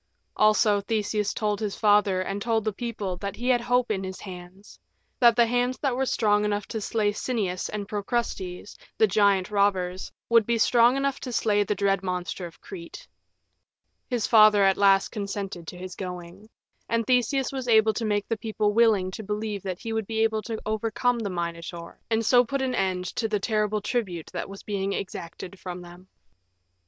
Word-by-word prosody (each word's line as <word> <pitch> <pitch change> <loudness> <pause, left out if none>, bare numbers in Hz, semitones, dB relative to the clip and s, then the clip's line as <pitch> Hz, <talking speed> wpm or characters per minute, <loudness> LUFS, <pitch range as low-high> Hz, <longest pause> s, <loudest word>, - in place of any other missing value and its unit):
Also 215 -1 +4
Theseus 210 0 -1
told 210 -2 -1
his 210 -3 -3
father 205 -3 +3
and 195 +2 -4
told 225 0 0
the 215 - 0
people 210 -5 -4
that 200 +2 -5
he 245 +2 -2
had 245 -2 +3
hope 245 0 +1
in 195 -2 -1
his 190 0 -6
hands 185 +1 -11 0.4
that 235 -2 +6
the 235 0 +5
hands 245 +2 0
that 270 -4 -1
were 265 +1 0
strong 210 -3 +2
enough 205 -1 -1
to 220 - -4
slay 210 0 0
Sinnias 205 -5 -2
and 205 -1 -5
Procrustes, 205 -3 -3 0.2
the 220 - +5
giant 200 -1 +2
robbers, 190 -3 0 0.2
would 230 -2 +4
be 235 0 +2
strong 240 +3 +4
enough 275 0 -1
to 255 - -6
slay 210 -3 +2
the 205 +1 -1
dread 195 -1 +1
monster 180 -1 -4
of 165 - -16
Crete. 355 -2 -10 1.0
His 240 -4 0
father 215 -2 +6
at 195 -1 +4
last 195 -1 +4
consented 200 -5 -5
to 180 - -7
his 185 0 -7
going. 180 +2 -8 0.4
And 230 -1 +1
Theseus 255 +2 +1
was 260 -2 -5
able 220 -1 +5
to 230 - -3
make 205 -2 0
the 225 - -1
people 215 -1 -1
willing 210 -5 +3
to 205 - -6
believe 210 0 -3
that 185 -2 -4
he 225 - -4
would 220 -2 -2
be 220 -1 0
able 220 -1 +1
to 220 0 -5
overcome 225 +3 0
the 210 -3 -3
Minotaur, 170 -1 -5
and 225 0 +1
so 245 +2 +6
put 270 +3 -2
an 260 -1 -1
end 185 -5 -1
to 225 - +1
the 210 -1 -1
terrible 210 0 0
tribute 195 -7 -3
that - - -4
was 195 0 -10
being 200 -1 -2
exacted 185 0 -6
from 180 -1 -7
them. 175 +2 -14
210 Hz, 190 wpm, -26 LUFS, 195-230 Hz, 1.0 s, that